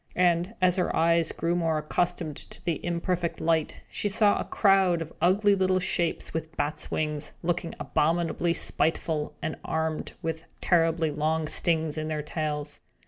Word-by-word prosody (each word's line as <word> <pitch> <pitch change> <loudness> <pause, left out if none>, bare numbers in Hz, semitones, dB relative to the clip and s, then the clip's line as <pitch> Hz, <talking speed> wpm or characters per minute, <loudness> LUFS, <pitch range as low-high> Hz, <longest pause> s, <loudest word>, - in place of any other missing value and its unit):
And, 175 +3 +2
as 180 0 +4
her 180 - 0
eyes 165 0 +3
grew 170 +1 -1
more 165 -2 +1
accustomed 165 0 -1
to - - -12
the 170 -4 -1
imperfect 175 0 -1
light, 160 -1 0
she 205 - -2
saw 205 0 +3
a - - -2
crowd 195 -4 +3
of 165 -1 -6
ugly 200 +3 +4
little 185 -1 +2
shapes, 175 -2 -1
with 160 0 -5
bats' 145 +1 -2
wings, 150 -1 -2
looking 170 0 -1
abominably 165 +4 +1
spiteful, 155 -1 +1
and 160 - -2
armed 160 -1 -2
with 165 0 -3
terribly 165 -2 +2
long 155 +1 0
stings 160 -2 +1
in 155 - -3
their 155 -1 -2
tails. 150 -1 -3
165 Hz, 155 wpm, -27 LUFS, 155-175 Hz, -, as